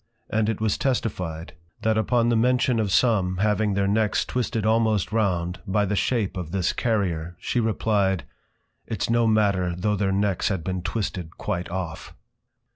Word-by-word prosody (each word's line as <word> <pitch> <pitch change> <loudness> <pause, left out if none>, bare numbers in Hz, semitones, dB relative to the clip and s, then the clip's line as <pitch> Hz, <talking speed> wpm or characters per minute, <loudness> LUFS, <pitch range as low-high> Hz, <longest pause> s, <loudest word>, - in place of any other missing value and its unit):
And 110 0 +1
it 110 - -2
was 110 -2 0
testified, 90 -11 -2 0.3
That 110 0 +2
upon 115 +2 +2
the 120 - +3
mention 125 +1 +2
of 105 -3 0
some 95 -6 +2
having 105 0 +1
their 100 0 +1
Necks 105 +1 +1
twisted 115 -3 -2
almost 110 -3 +2
round, 90 -5 0
by 105 +2 +2
the 105 +1 -1
Shape 105 -2 0
of 90 -3 -4
this 90 -1 0
Carrier, 90 -7 -1
she 125 - -1
replyed, 105 -4 +1 0.7
_Its 110 0 -1
no 115 0 +3
matter 100 -5 +2
though 105 +3 0
their 100 -1 0
Necks 100 -1 +1
had 95 -5 -2
been 90 +1 -2
twisted 90 -3 -4
quite 90 -4 -3
off. 85 -3 -5
105 Hz, 165 wpm, -24 LUFS, 90-110 Hz, 0.7 s, the